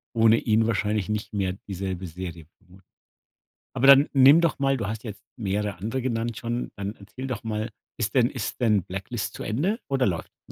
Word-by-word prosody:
ohne 115 0 +5
ihn 110 0 +2
wahrscheinlich 105 -2 0
nicht 105 0 -3
mehr 95 -2 0
dieselbe 95 -1 -4
Serie, 85 -1 -7
vermut 95 -1 -20 0.9
aber 135 - +2
dann 140 +1 +8
nimm 140 +4 +7
doch 170 -4 +1
mal 135 0 +2
du 105 -4 -3
hast 110 +2 -5
jetzt 105 -2 -8
mehrere 105 -2 -2
andere 115 +7 -3
genannt 115 -2 -2
schon 120 +1 -3
dann 100 +1 -5
erzähl 105 +7 -8
doch 115 -4 -4
mal, 110 +1 -2 0.3
ist 110 0 -2
denn 125 -2 +4
ist 125 -1 -5
denn 105 -5 +3
„Blacklist” 95 +5 -5
zu - - -6
Ende 170 - 0
oder 135 -2 +1
läuft 85 -4 -2
noch. - - -61
110 Hz, 195 wpm, -25 LUFS, 100-125 Hz, 0.9 s, dann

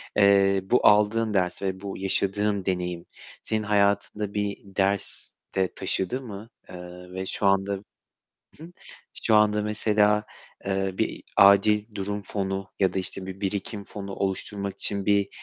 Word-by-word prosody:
eee, 100 -1 +5
bu 120 +6 +3
aldığın 105 +1 +4
ders 90 -3 0
ve 95 -1 -3
bu 100 -1 -5
yaşadığın 100 +1 0
deneyim 90 -2 -2 0.4
senin 110 -1 -1
hayatında 100 0 +1
bir 105 -1 -1
ders 100 0 -1 0.2
de 95 -1 +1
taşıdı 110 +8 -2
mı? 110 -3 -9 0.2
Eee, 90 0 -10
ve 95 0 -4
şu 100 - -3
anda 95 0 +3 0.9
Hı 155 - -12
hı. 170 - -11 0.5
Şu 110 - +4
anda 105 0 +4
mesela, 105 0 +2 0.4
eee, 95 0 0
bir - - -2
acil 105 +2 +5
durum 100 +1 -3
fonu 95 -1 -3
ya 95 - +2
da - - 0
işte 95 0 -4
bir 95 0 -8
birikim 100 +1 -3
fonu 100 -1 -7
oluşturmak 100 0 -3
için 100 0 -2
bir 100 -1 +2
100 Hz, 150 wpm, -26 LUFS, 95-105 Hz, 0.9 s, eee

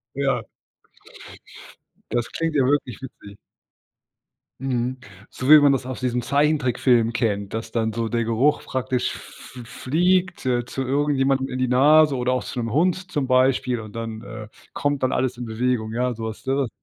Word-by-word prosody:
Ja. 140 -1 0 1.7
Das 120 -1 0
klingt 165 -2 -2
ja 135 - +4
wirklich 135 -2 0
witzig. 105 -6 -11 1.3
Mhm, 130 -1 -1 0.3
so 130 - -5
wie 155 0 +10
man 145 -1 +5
das 130 -2 -1
aus 130 -1 -6
diesem 125 -1 0
Zeichentrickfilm 130 -4 +2
kennt, 100 -3 -1
dass 115 0 -5
dann 110 -2 -1
so 115 -1 -2
der 115 -1 0
Geruch 120 +6 +1
praktisch 130 -1 -2
f - - -13
f - - -13
fliegt, 180 +8 0
äh, 120 -1 0
zu 135 - -4
irgendjemandem 135 -1 +1
in 130 - -5
die 130 - +1
Nase 150 +4 +5
oder 125 0 0
auch 125 - -2
zu 125 - -6
'nem 115 -1 -2
Hund 180 - 0
zum 140 -3 -1
Beispiel 130 -2 +2
und 110 0 -10
dann, 115 -1 -5
äh, 110 -1 -9 0.3
kommt 145 -2 -1
dann 130 - +1
alles 125 -1 -1
in 120 - -5
Bewegung, 110 -1 -1
ja, 125 +1 0
sowas, 110 0 -6
ne? 135 -1 0
130 Hz, 170 wpm, -23 LUFS, 115-140 Hz, 1.7 s, wie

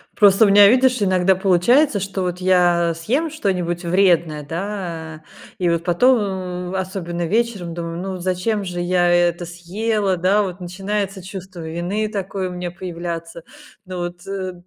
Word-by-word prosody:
Просто 205 +1 +6
у - - +4
меня, 200 0 +8
видишь, 250 +1 +3
иногда 185 -1 +3
получается, 200 - +3
что 195 0 -3
вот 180 0 -3
я 175 -2 +3
съем 255 - -1
что-нибудь 180 - -2
вредное, 170 -4 +2
да. 165 -2 -5 0.4
И 180 -2 +1
вот 170 0 0
потом, 245 +10 +4 0.5
ну, - - -4
особенно 180 -2 -3
вечером, 210 -5 -1
думаю: 170 -1 -5
"Ну 190 +1 -4
вот 180 -2 -7
зачем 190 +3 -1
же 180 -2 -5
я 175 0 +2
это 175 0 +2
съела?" 190 +3 -1
Да, 190 +4 +3
вот 190 -2 -4
начинается 195 +2 -3
чувство 190 -1 -9
вины 175 +6 -2
такое 195 -2 -3
у - - -7
меня 180 0 -5
появляться. 170 -2 -6 0.4
Ну 185 0 -6
вот, 175 0 -6
э, 190 -2 -4
185 Hz, 160 wpm, -20 LUFS, 175-200 Hz, 0.5 s, меня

